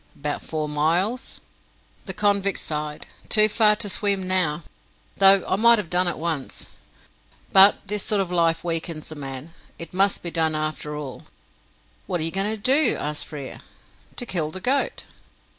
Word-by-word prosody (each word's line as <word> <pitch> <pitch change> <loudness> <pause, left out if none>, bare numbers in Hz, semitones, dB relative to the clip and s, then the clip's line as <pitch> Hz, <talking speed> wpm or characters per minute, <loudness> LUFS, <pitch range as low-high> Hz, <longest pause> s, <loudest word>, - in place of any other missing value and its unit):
"About 145 0 -4
four 155 -1 -4
miles." 170 - -1 0.7
The 190 - -2
convict 200 -2 +1
sighed. 150 -1 -5 0.2
"Too 215 -1 +5
far 215 0 +3
to 210 0 -2
swim 200 -2 -1
now, 175 -4 0 0.5
though 195 -1 +6
I - - +1
might 235 +2 +6
have 195 -6 -4
done 180 0 +2
it 175 - -1
once. 160 -4 -4 0.8
But 195 +1 +8
this 210 +1 -3
sort 210 +1 0
of 190 -2 -2
life 165 -2 +1
weakens 165 -2 -3
a - - -7
man. 135 +2 -7 0.2
It 170 - -8
must 195 +2 +2
be 170 - -4
done 160 -1 +1
after 155 -1 -3
all." 145 -3 -7 0.8
"What 180 -2 -1
are - - -1
you 165 - 0
going 195 +3 0
to 220 - -3
do?" 265 +5 +3
asked 150 0 -4
Frere. 140 -3 -8 0.6
"To 245 - -4
kill 170 -8 -1
the 185 - -7
goat." 270 +7 -1
180 Hz, 170 wpm, -23 LUFS, 155-200 Hz, 0.8 s, But